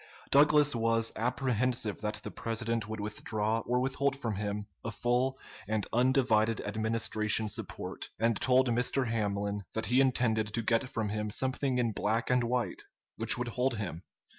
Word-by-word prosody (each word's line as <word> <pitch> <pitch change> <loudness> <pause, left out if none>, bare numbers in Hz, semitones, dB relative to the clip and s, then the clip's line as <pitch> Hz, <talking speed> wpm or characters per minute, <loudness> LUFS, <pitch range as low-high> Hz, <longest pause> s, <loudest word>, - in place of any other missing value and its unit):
Douglas 145 0 +5
was 115 0 +1
apprehensive 120 -2 0
that 105 -1 -3
the - - -5
President 115 -1 -2
would 110 0 -4
withdraw 105 +1 -1
or 125 +1 +2
withhold 135 +2 0
from 115 -5 -2
him 105 0 -3 0.2
a 115 - -3
full 125 +4 0 0.3
and 110 -1 0
undivided 120 -3 +3
Administration 110 0 0
support, - - -6
and 115 0 +2
told 130 0 +3
Mr. 125 +3 +2
Hamlin 100 -2 -1
that 110 - -1
he 125 +2 +4
intended 120 -5 +2
to 115 - -1
get 115 +3 +1
from 110 -4 -2
him 105 0 -2
something 130 +3 0
in 120 -2 +1
black 110 +3 -1
and 125 -1 +3
white 120 +1 -1 0.4
which 115 0 +3
would 120 0 -2
hold 125 +1 0
him. 90 -6 -4
115 Hz, 160 wpm, -31 LUFS, 110-125 Hz, 0.4 s, Douglas